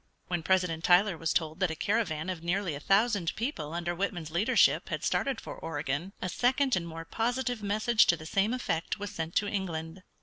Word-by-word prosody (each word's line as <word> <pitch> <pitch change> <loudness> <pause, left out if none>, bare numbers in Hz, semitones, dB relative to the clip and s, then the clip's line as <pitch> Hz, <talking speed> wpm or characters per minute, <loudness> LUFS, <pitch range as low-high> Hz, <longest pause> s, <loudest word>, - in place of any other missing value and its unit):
When 175 -2 -1
President 180 -2 +1
Tyler 180 +2 +5
was 165 0 -1
told 160 0 -1
that 185 -2 +2
a 160 - -3
caravan 185 -4 -1
of 175 -3 -6
nearly 180 0 0
a 145 - -5
thousand 195 +1 +2
people 220 - -3
under 175 +1 -2
Whitman's 175 -3 -3
leadership 205 +10 +3
had - - -3
started 270 -4 0
for - - -7
Oregon, 150 +2 -3
a - - 0
second 255 +7 +2
and 170 -2 -2
more 165 0 -7
positive 245 +4 -1
message 215 +3 +3
to 175 - +4
the 155 - -10
same 195 +6 +1
effect 185 -10 -2
was 205 0 -5
sent 165 -3 -5
to 205 - +2
England. 180 -4 -4
180 Hz, 200 wpm, -30 LUFS, 165-210 Hz, -, Tyler